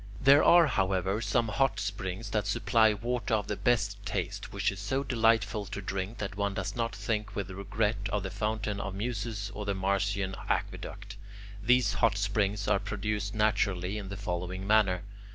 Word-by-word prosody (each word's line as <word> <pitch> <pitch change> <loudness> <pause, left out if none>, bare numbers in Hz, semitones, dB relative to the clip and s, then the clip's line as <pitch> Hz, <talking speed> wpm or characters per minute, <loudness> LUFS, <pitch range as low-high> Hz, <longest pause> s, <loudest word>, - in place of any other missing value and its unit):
There 140 +3 +6
are, 170 -1 +7
however, 95 -4 0
some 115 +2 +1
hot 135 +6 +1
springs 100 0 -4
that 105 -2 0
supply 110 0 +3
water 120 +1 -1
of 105 - -1
the 105 - -2
best 100 -5 0
taste, - - -3
which - - 0
is 100 - -8
so 130 +7 -1
delightful 110 -5 +2
to 100 +1 -5
drink 95 +3 -4
that 100 -1 -4
one 100 -1 -1
does - - -3
not 115 -1 -1
think 105 -2 -2
with 100 -2 -3
regret 100 +2 -1
of 105 -2 0
the 95 - -4
Fountain 105 0 -2
of 100 - -4
the - - -7
Muses 105 -2 -3
or 105 - -5
the 100 -1 -1
Marcian 95 0 0
aqueduct. 100 0 -3 0.4
These 125 +3 +3
hot 110 -3 +2
springs 100 0 0
are 100 - +3
produced 105 0 -3
naturally, 105 -2 +1
in 100 -2 -7
the 100 - -5
following 90 -1 -4
manner. 100 -4 +3
105 Hz, 180 wpm, -30 LUFS, 100-110 Hz, 0.4 s, are